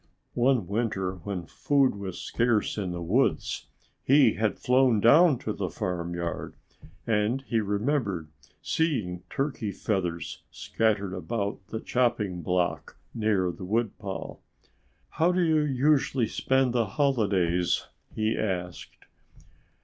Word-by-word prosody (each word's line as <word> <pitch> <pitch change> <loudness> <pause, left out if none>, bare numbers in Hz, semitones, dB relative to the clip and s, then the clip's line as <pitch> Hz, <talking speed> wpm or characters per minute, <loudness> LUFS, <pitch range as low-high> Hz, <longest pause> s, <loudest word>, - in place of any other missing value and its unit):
One 125 -4 +2
winter 100 -2 -1
when 90 -1 -5
food 140 - +2
was 100 -3 -6
scarce 115 -3 0
in 95 -4 -3
the 85 0 -4
woods 110 +11 0 0.4
he 140 -4 +5
had 110 -1 -1
flown 125 -3 +3
down 145 - +6
to - - -4
the - - -3
farmyard. 85 -1 -4 0.5
And 110 +4 +1
he 115 -4 0
remembered 105 - -1 0.3
seeing 110 - -1
turkey 135 -7 -2
feathers 90 -5 -3
scattered 105 -4 -1
about 100 +4 -3
the 110 - -4
chopping 105 -9 0
block 90 +1 -1 0.2
near 105 -5 +1
the 90 - -10
woodpile. 105 -1 -3 0.7
"How 170 +3 +2
do 180 0 +1
you 160 -2 +3
usually 135 -2 +2
spend 130 +2 +1
the 115 -3 +1
holidays?" 100 - +1 0.3
he 110 0 0
asked. 90 -4 -4
110 Hz, 120 wpm, -27 LUFS, 90-130 Hz, 0.7 s, down